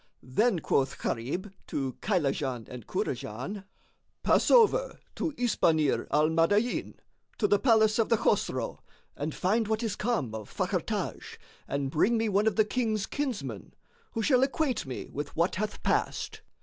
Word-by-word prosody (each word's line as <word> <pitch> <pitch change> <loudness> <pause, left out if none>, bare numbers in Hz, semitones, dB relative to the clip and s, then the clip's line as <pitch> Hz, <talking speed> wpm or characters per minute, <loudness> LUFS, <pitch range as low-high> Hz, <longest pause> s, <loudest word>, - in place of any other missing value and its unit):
Then 200 - +2
quoth 135 -2 +1
Gharib 160 - -3
to 135 -2 -2
Kaylajan 135 - -1
and 125 -4 -9
Kurajan, 140 - -4 0.6
"Pass - - +3
over - - +4
to 325 - -2
Isbánír 165 - +2
al 150 +1 +3
Madáin, 205 +9 +1 0.4
to 210 - +2
the 205 0 +3
palace 220 -3 +4
of 225 - +2
the 230 - +4
Chosroe, - - 0 0.4
and 150 +2 -4
find 215 +4 +1
what 220 +1 0
is 215 -3 -1
come 210 - -1
of 110 -2 -7
Fakhr - - -1
Taj - - -4 0.3
and 140 -1 -2
bring 205 +10 +3
me 225 -1 +1
one 205 +2 +2
of 220 - +2
the 215 - +4
King's 215 -3 0
kinsmen, 270 -7 -4 0.4
who 225 - -1
shall 255 +1 +4
acquaint 270 - 0
me 130 - -5
with 145 +1 -5
what 170 +3 +1
hath 210 +1 -3
passed." - - -1
205 Hz, 155 wpm, -29 LUFS, 145-225 Hz, 0.6 s, over